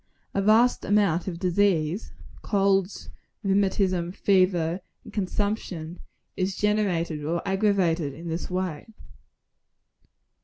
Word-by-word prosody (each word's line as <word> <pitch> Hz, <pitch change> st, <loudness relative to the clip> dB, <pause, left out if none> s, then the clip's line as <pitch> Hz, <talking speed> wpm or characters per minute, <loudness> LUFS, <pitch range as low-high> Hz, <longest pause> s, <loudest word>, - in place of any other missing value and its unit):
A 200 Hz, -, +1 dB
vast 220 Hz, +5 st, +4 dB
amount 200 Hz, -5 st, +2 dB
of 175 Hz, -3 st, -3 dB
disease 180 Hz, 0 st, +1 dB, 0.3 s
colds, 195 Hz, -2 st, 0 dB, 0.3 s
rheumatism, 190 Hz, -3 st, +1 dB
fever 185 Hz, -3 st, +2 dB, 0.2 s
and -, -, -13 dB
consumption 190 Hz, -4 st, -3 dB, 0.4 s
is 185 Hz, 0 st, -1 dB
generated 180 Hz, -7 st, 0 dB
or 165 Hz, +3 st, -1 dB
aggravated 190 Hz, -6 st, +1 dB
in 165 Hz, +3 st, -9 dB
this 165 Hz, +1 st, -4 dB
way. 180 Hz, -3 st, -3 dB
185 Hz, 100 wpm, -26 LUFS, 170-200 Hz, 0.4 s, vast